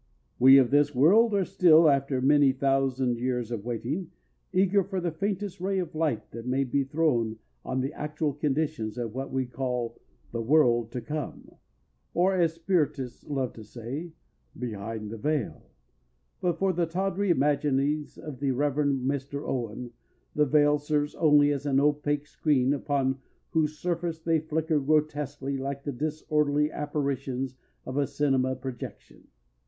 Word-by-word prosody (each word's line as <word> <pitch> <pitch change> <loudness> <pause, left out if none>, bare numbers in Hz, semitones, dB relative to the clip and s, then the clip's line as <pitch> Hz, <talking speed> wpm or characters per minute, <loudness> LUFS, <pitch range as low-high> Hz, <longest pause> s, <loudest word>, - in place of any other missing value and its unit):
We 135 +2 +9
of 130 -2 +4
this 145 0 +3
world 205 - +5
are 195 -2 +2
still, 165 -3 +5
after 140 -2 +2
many 140 0 +5
thousand 135 -2 +1
years 125 -2 -2
of 110 -4 -4
waiting, 125 - -3 0.4
eager 195 +1 +3
for 190 0 -3
the 175 -1 -2
faintest 195 +2 -3
ray 195 +1 0
of 180 -4 -3
light 155 -8 -1
that 115 +1 -8
may 130 +2 +1
be 135 +2 0
thrown 135 -6 0 0.3
on 130 0 -2
the 135 +3 -3
actual 150 0 -2
conditions 145 -6 -2
of 115 -3 -4
what 135 +2 -5
we 130 -1 0
call 125 -2 -3 0.3
"the 115 - -3
world 120 -3 +3
to 125 - -3
come," 150 +4 -6 0.6
or 185 +3 +3
as 170 -3 +2
the 165 - -24
Spiritists 150 -8 -1
love 135 -4 -2
to 110 - -10
say, 125 +10 -7 0.5
"behind 110 -2 -5
the 115 - -7
veil," 150 -3 -2 0.7
but 175 -2 0
for 190 +1 +1
the 170 -1 0
tawdry 195 +3 -1
imaginings 145 -1 +1
of 145 -5 -8
the 140 -1 0
Reverend 140 0 0
Mr. 140 +1 -3
Owen 120 -1 -4 0.4
the 150 -1 +2
"Veil" 145 +1 +4
serves 150 0 -1
only 145 -2 +4
as 145 0 -2
an 135 -1 +3
opaque 145 0 +1
screen 140 -3 +1
upon 135 -2 0 0.3
whose 155 -1 0
surface 170 -1 -2
they 165 0 +1
flicker 155 0 0
grotesquely 145 -1 0
like 140 +1 -4
the 145 - -3
disorderly 150 +1 0
apparitions 135 -3 -3 0.3
of 130 - -5
a 140 -1 +2
cinema 130 -3 +1
projection. 130 -1 -9
145 Hz, 155 wpm, -27 LUFS, 130-155 Hz, 0.7 s, We